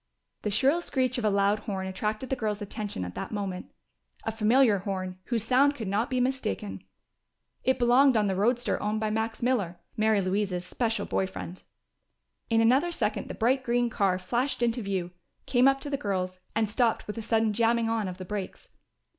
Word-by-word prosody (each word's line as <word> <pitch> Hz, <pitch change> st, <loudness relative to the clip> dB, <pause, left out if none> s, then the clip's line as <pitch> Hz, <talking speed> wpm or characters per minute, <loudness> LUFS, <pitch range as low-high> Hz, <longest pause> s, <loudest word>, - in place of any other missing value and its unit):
The 210 Hz, -, -1 dB
shrill 275 Hz, -, +3 dB
screech 255 Hz, -6 st, 0 dB
of 225 Hz, -, -2 dB
a -, -, +4 dB
loud 200 Hz, +1 st, +2 dB
horn 195 Hz, -3 st, -4 dB
attracted 215 Hz, +6 st, -3 dB
the -, -, +2 dB
girls' 215 Hz, -4 st, -2 dB
attention 205 Hz, -, -4 dB
at 90 Hz, -, -7 dB
that -, -, -5 dB
moment. 195 Hz, -4 st, -4 dB, 0.5 s
A 225 Hz, -, -1 dB
familiar 225 Hz, 0 st, +4 dB
horn, 185 Hz, -1 st, -4 dB
whose 235 Hz, -4 st, -1 dB
sound 270 Hz, +5 st, +4 dB
could 225 Hz, -6 st, -5 dB
not 205 Hz, +5 st, 0 dB
be 255 Hz, -, 0 dB
mistaken. 250 Hz, -5 st, -2 dB, 0.8 s
It 260 Hz, -, +2 dB
belonged 250 Hz, +1 st, +5 dB
on 210 Hz, -, +3 dB
the 195 Hz, -1 st, 0 dB
roadster 235 Hz, +3 st, +1 dB
owned 210 Hz, +1 st, -1 dB
by 215 Hz, -1 st, -1 dB
Max 220 Hz, +1 st, -2 dB
Miller, 205 Hz, -9 st, 0 dB, 0.2 s
Mary 215 Hz, -1 st, +3 dB
Louise's 185 Hz, -1 st, -1 dB
special 225 Hz, -4 st, -1 dB
boy 190 Hz, -, 0 dB
friend. 185 Hz, -1 st, -8 dB, 0.9 s
In 225 Hz, -1 st, +3 dB
another 265 Hz, +10 st, +4 dB
second -, -, -1 dB
the -, -, -6 dB
bright 255 Hz, +3 st, +2 dB
green 240 Hz, -1 st, +1 dB
car 195 Hz, -4 st, +2 dB
flashed 240 Hz, +7 st, -1 dB
into 235 Hz, +1 st, +1 dB
view, 190 Hz, -4 st, -2 dB, 0.3 s
came 250 Hz, 0 st, +4 dB
up 275 Hz, 0 st, +3 dB
to 290 Hz, -, -4 dB
the 280 Hz, -, 0 dB
girls, 185 Hz, -4 st, -2 dB, 0.2 s
and 220 Hz, 0 st, +2 dB
stopped 230 Hz, +2 st, +1 dB
with 210 Hz, +2 st, -5 dB
a -, -, -3 dB
sudden 225 Hz, -1 st, +1 dB
jamming 230 Hz, +1 st, +2 dB
on 225 Hz, -3 st, 0 dB
of 180 Hz, -1 st, -6 dB
the 185 Hz, -, -7 dB
brakes. 200 Hz, 0 st, -6 dB
220 Hz, 195 wpm, -28 LUFS, 200-245 Hz, 0.9 s, belonged